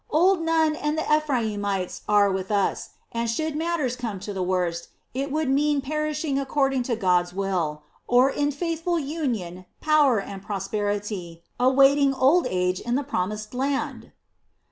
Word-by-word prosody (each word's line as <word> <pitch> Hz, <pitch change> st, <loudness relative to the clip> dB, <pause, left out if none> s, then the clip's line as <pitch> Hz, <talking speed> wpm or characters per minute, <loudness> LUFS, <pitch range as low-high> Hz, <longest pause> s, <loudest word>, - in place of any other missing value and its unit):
Old 350 Hz, +3 st, +3 dB
Nun 325 Hz, -1 st, +2 dB
and 300 Hz, 0 st, -2 dB
the 315 Hz, -, 0 dB
Ephraimites 210 Hz, -10 st, -1 dB
are 205 Hz, -1 st, +4 dB
with 190 Hz, 0 st, -3 dB
us, 200 Hz, -2 st, 0 dB, 0.2 s
and 230 Hz, 0 st, -2 dB
should 310 Hz, +6 st, -2 dB
matters 315 Hz, -6 st, -1 dB
come 230 Hz, -6 st, -5 dB
to 205 Hz, -, -5 dB
the 190 Hz, -, -3 dB
worst, 180 Hz, -2 st, -1 dB, 0.3 s
it 275 Hz, +3 st, -3 dB
would 310 Hz, 0 st, 0 dB
mean 290 Hz, +2 st, +2 dB
perishing 305 Hz, 0 st, -2 dB
according 270 Hz, -1 st, +1 dB
to 245 Hz, -1 st, -1 dB
God's 180 Hz, -4 st, +1 dB
will, 175 Hz, -6 st, -2 dB, 0.2 s
or 250 Hz, +3 st, +4 dB
in 290 Hz, +1 st, 0 dB
faithful 335 Hz, +3 st, -2 dB
union, 240 Hz, -, -3 dB
power, 295 Hz, -7 st, +4 dB
and 195 Hz, -1 st, -7 dB
prosperity, 200 Hz, -3 st, -3 dB, 0.2 s
awaiting 270 Hz, +2 st, +4 dB
old 275 Hz, +7 st, +4 dB
age 180 Hz, 0 st, 0 dB
in 240 Hz, +1 st, -2 dB
the 285 Hz, -, 0 dB
Promised 215 Hz, -4 st, -3 dB
Land." 270 Hz, +2 st, -2 dB
250 Hz, 150 wpm, -25 LUFS, 195-295 Hz, 0.3 s, are